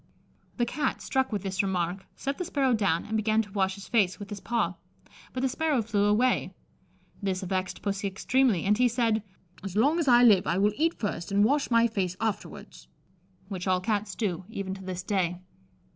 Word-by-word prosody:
The 240 Hz, -, +2 dB
Cat, 265 Hz, +3 st, -2 dB
struck 265 Hz, -1 st, -1 dB
with 205 Hz, -3 st, -2 dB
this 190 Hz, -1 st, 0 dB
remark, 190 Hz, -1 st, -2 dB
set 275 Hz, +1 st, -4 dB
the 360 Hz, -, -2 dB
sparrow 270 Hz, -5 st, +1 dB
down, 200 Hz, -7 st, +1 dB
and 220 Hz, -, -3 dB
began 220 Hz, +1 st, +2 dB
to 205 Hz, -, -14 dB
wash 190 Hz, -1 st, 0 dB
his 200 Hz, -, -10 dB
face 205 Hz, -6 st, +2 dB
with 205 Hz, -1 st, -9 dB
his 205 Hz, -, -5 dB
paw, 225 Hz, -6 st, -1 dB, 0.6 s
but 255 Hz, -, -4 dB
the 265 Hz, -, +2 dB
sparrow 290 Hz, -2 st, 0 dB
flew 205 Hz, -2 st, +1 dB
away. 225 Hz, +5 st, +2 dB, 0.7 s
This 190 Hz, -2 st, -2 dB
vexed 185 Hz, 0 st, -3 dB
Pussy 200 Hz, 0 st, -1 dB
extremely, 225 Hz, +1 st, +1 dB
and 205 Hz, +2 st, +4 dB
he 250 Hz, -, +5 dB
said, 230 Hz, -2 st, +1 dB, 0.4 s
"As 195 Hz, -1 st, -6 dB
long 285 Hz, +10 st, +3 dB
as 320 Hz, -, 0 dB
I 245 Hz, -1 st, +7 dB
live 210 Hz, -6 st, +6 dB
I 170 Hz, -, +1 dB
will 205 Hz, +2 st, +3 dB
eat 325 Hz, +3 st, +1 dB
first 195 Hz, -4 st, -3 dB
and 200 Hz, +1 st, +4 dB
wash 285 Hz, +4 st, +1 dB
my 230 Hz, -1 st, +4 dB
face 195 Hz, -6 st, -1 dB
afterwards." 220 Hz, -2 st, -5 dB, 0.6 s
Which 190 Hz, -2 st, -5 dB
all 185 Hz, -1 st, +3 dB
Cats 205 Hz, 0 st, -2 dB
do, 190 Hz, -6 st, -2 dB
even 195 Hz, -4 st, -4 dB
to 190 Hz, 0 st, -9 dB
this 185 Hz, -1 st, -5 dB
day. 180 Hz, -3 st, -1 dB
205 Hz, 200 wpm, -28 LUFS, 190-240 Hz, 0.7 s, I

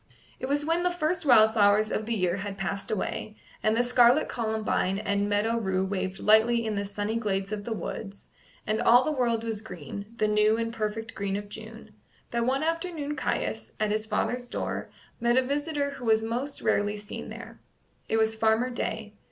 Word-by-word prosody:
It 260 Hz, -, -3 dB
was 290 Hz, +1 st, 0 dB
when 330 Hz, +2 st, +1 dB
the 360 Hz, -, +2 dB
first 335 Hz, -2 st, -1 dB
wild 220 Hz, -3 st, +7 dB
flowers 210 Hz, 0 st, +4 dB
of 215 Hz, -, -2 dB
the 235 Hz, -, 0 dB
year 185 Hz, -2 st, +1 dB
had 200 Hz, 0 st, -5 dB
passed 195 Hz, +1 st, -3 dB
away, 215 Hz, +1 st, -3 dB, 0.3 s
and 215 Hz, +1 st, +2 dB
scarlet 245 Hz, +3 st, +5 dB
columbine 220 Hz, -4 st, -1 dB
and 200 Hz, -1 st, 0 dB
meadow 220 Hz, +3 st, +1 dB
rue 190 Hz, -3 st, 0 dB
waved 190 Hz, -1 st, -2 dB
lightly 225 Hz, +3 st, +4 dB
in 220 Hz, -, -1 dB
the 200 Hz, 0 st, -2 dB
sunny 205 Hz, +2 st, -2 dB
glades 195 Hz, -3 st, -1 dB
of 205 Hz, -1 st, -4 dB
the 235 Hz, -, -4 dB
woods, 200 Hz, -2 st, -6 dB, 0.4 s
and 215 Hz, 0 st, 0 dB
all 245 Hz, +2 st, +6 dB
the 310 Hz, -, 0 dB
world 235 Hz, -5 st, 0 dB
was 220 Hz, -2 st, -3 dB
green 185 Hz, -1 st, -8 dB
the 215 Hz, -, +2 dB
new 210 Hz, +1 st, +3 dB
and 230 Hz, 0 st, -2 dB
perfect 225 Hz, 0 st, -3 dB
green 195 Hz, -1 st, -2 dB
of 205 Hz, 0 st, -5 dB
June 220 Hz, +1 st, -10 dB, 0.4 s
that 235 Hz, 0 st, 0 dB
one 270 Hz, +3 st, +1 dB
afternoon 330 Hz, -3 st, -2 dB
Caius, 110 Hz, -, -2 dB
at 215 Hz, -1 st, +1 dB
his 215 Hz, +1 st, -1 dB
father's 245 Hz, +3 st, -1 dB
door, -, -, -3 dB, 0.3 s
met 235 Hz, +1 st, +2 dB
a 260 Hz, -, +5 dB
visitor 290 Hz, +1 st, -1 dB
who 265 Hz, -3 st, -8 dB
was 220 Hz, -1 st, +3 dB
most 245 Hz, +5 st, -3 dB
rarely 205 Hz, +1 st, +1 dB
seen 205 Hz, 0 st, -7 dB
there. -, -, -9 dB, 0.5 s
It 225 Hz, -, +2 dB
was 220 Hz, 0 st, +3 dB
Farmer 225 Hz, +3 st, +2 dB
Day. 220 Hz, -3 st, -3 dB
220 Hz, 195 wpm, -27 LUFS, 205-245 Hz, 0.5 s, wild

